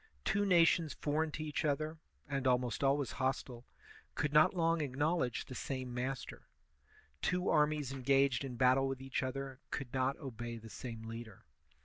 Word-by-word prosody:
Two 205 Hz, +1 st, +2 dB
nations 165 Hz, -4 st, +4 dB
foreign 155 Hz, +2 st, 0 dB
to 155 Hz, -, -3 dB
each 150 Hz, +1 st, -2 dB
other, 155 Hz, +2 st, -1 dB, 0.3 s
and 135 Hz, -2 st, -1 dB
almost 125 Hz, -2 st, +1 dB
always 140 Hz, -1 st, +2 dB
hostile, 130 Hz, -2 st, -2 dB, 0.5 s
could 150 Hz, -1 st, -1 dB
not 155 Hz, +5 st, +6 dB
long 165 Hz, -1 st, +2 dB
acknowledge 145 Hz, -1 st, 0 dB
the -, -, -9 dB
same 130 Hz, 0 st, -4 dB
master; 130 Hz, +2 st, -4 dB, 0.7 s
two 180 Hz, +1 st, +1 dB
armies 150 Hz, -3 st, +2 dB
engaged 135 Hz, -1 st, +2 dB
in 130 Hz, -3 st, -5 dB
battle 130 Hz, +2 st, +4 dB
with 135 Hz, -1 st, -3 dB
each 135 Hz, 0 st, -2 dB
other 135 Hz, 0 st, -4 dB
could 135 Hz, -3 st, -5 dB
not 130 Hz, +1 st, +1 dB
obey 120 Hz, -4 st, -6 dB
the 115 Hz, 0 st, -11 dB
same 115 Hz, -3 st, -7 dB
leader. 115 Hz, -4 st, -8 dB
135 Hz, 155 wpm, -35 LUFS, 125-150 Hz, 0.7 s, not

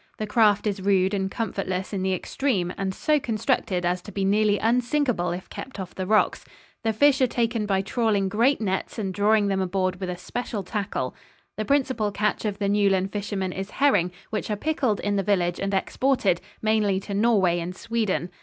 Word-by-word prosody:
The 215 Hz, -, -2 dB
craft 210 Hz, -1 st, +3 dB
is 200 Hz, -2 st, -1 dB
rude 190 Hz, 0 st, +2 dB
and 190 Hz, -1 st, 0 dB
comfortless 190 Hz, -3 st, -3 dB
in 195 Hz, -, -1 dB
the 190 Hz, 0 st, +1 dB
extreme 185 Hz, -4 st, -1 dB
and 195 Hz, -1 st, -2 dB
so 300 Hz, +10 st, +1 dB
constructed 205 Hz, -6 st, -1 dB
as 180 Hz, +1 st, 0 dB
to 205 Hz, -, -10 dB
be 195 Hz, 0 st, -1 dB
nearly 205 Hz, +1 st, +3 dB
unsinkable 240 Hz, -4 st, +1 dB
if 180 Hz, +2 st, -5 dB
kept 260 Hz, -6 st, -8 dB
off 185 Hz, -2 st, -6 dB
the 185 Hz, -1 st, -4 dB
rocks. 215 Hz, +1 st, +2 dB, 0.4 s
The 225 Hz, -, +2 dB
fish 275 Hz, +5 st, +4 dB
are 255 Hz, -, +5 dB
taken 230 Hz, -2 st, -1 dB
by 195 Hz, -1 st, +1 dB
trawling 205 Hz, -2 st, +1 dB
great 235 Hz, +8 st, +2 dB
nets 190 Hz, 0 st, -2 dB
and 195 Hz, -4 st, -2 dB
drawing 205 Hz, +1 st, +3 dB
them 195 Hz, -1 st, 0 dB
aboard 185 Hz, -1 st, -1 dB
with 185 Hz, -2 st, -3 dB
a 180 Hz, -, -4 dB
special 220 Hz, +2 st, -4 dB
tackle. 190 Hz, -, -3 dB, 0.4 s
The 215 Hz, -, -3 dB
principal 260 Hz, -6 st, +1 dB
catch 210 Hz, +2 st, -1 dB
of 205 Hz, -2 st, -1 dB
the 200 Hz, -1 st, -1 dB
Newlyn 195 Hz, -2 st, +2 dB
fishermen 195 Hz, -3 st, -3 dB
is 195 Hz, +1 st, -5 dB
herring, 205 Hz, -12 st, +2 dB, 0.2 s
which 220 Hz, -, -3 dB
are 210 Hz, -, 0 dB
pickled 260 Hz, -5 st, 0 dB
in 205 Hz, 0 st, 0 dB
the -, -, +2 dB
village 180 Hz, -3 st, +1 dB
and 195 Hz, 0 st, -1 dB
exported, 200 Hz, -1 st, +1 dB, 0.2 s
mainly 215 Hz, -3 st, +2 dB
to 200 Hz, -, -6 dB
Norway 200 Hz, -5 st, +3 dB
and 175 Hz, +2 st, -5 dB
Sweden. 215 Hz, -5 st, -1 dB
205 Hz, 195 wpm, -25 LUFS, 190-220 Hz, 0.4 s, are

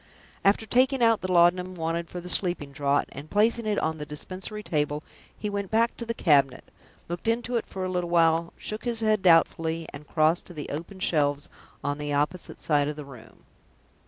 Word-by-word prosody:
After 200 Hz, +3 st, +3 dB
taking 255 Hz, +3 st, +3 dB
out 230 Hz, -1 st, +4 dB
the 185 Hz, 0 st, -3 dB
laudanum 180 Hz, +1 st, +3 dB
wanted 165 Hz, 0 st, -2 dB
for 180 Hz, -, -6 dB
the 175 Hz, -, -9 dB
sleeping 175 Hz, -6 st, 0 dB
draught, 140 Hz, +1 st, 0 dB
and 145 Hz, +3 st, -9 dB
placing 225 Hz, +2 st, +2 dB
it 210 Hz, -1 st, 0 dB
on 160 Hz, 0 st, -1 dB
the -, -, -4 dB
dispensary 185 Hz, +7 st, -6 dB
table, 150 Hz, -2 st, -1 dB, 0.3 s
he 210 Hz, -, -4 dB
went 200 Hz, -2 st, -3 dB
back 230 Hz, +2 st, +2 dB
to 235 Hz, -, -6 dB
the 230 Hz, -, -2 dB
cabinet, 140 Hz, -, +3 dB, 0.4 s
looked 175 Hz, +5 st, -5 dB
into 240 Hz, +2 st, 0 dB
it 230 Hz, -, -1 dB
for 190 Hz, -1 st, -4 dB
a -, -, -2 dB
little 180 Hz, -1 st, -2 dB
while, 165 Hz, 0 st, +3 dB
shook 215 Hz, +1 st, -4 dB
his 235 Hz, -2 st, -1 dB
head 215 Hz, -2 st, +2 dB
doubtfully, 165 Hz, -2 st, +3 dB
and 145 Hz, +1 st, -10 dB
crossed 160 Hz, +2 st, +2 dB
to 175 Hz, -, -12 dB
the 150 Hz, -, -6 dB
open 170 Hz, +6 st, -6 dB
shelves 145 Hz, -4 st, +1 dB, 0.3 s
on 145 Hz, +1 st, -2 dB
the 145 Hz, 0 st, -3 dB
opposite 150 Hz, +5 st, -1 dB
side 145 Hz, -2 st, +2 dB
of 150 Hz, -, -3 dB
the 150 Hz, -1 st, -8 dB
room. 125 Hz, -5 st, -14 dB
175 Hz, 200 wpm, -26 LUFS, 150-205 Hz, 0.4 s, out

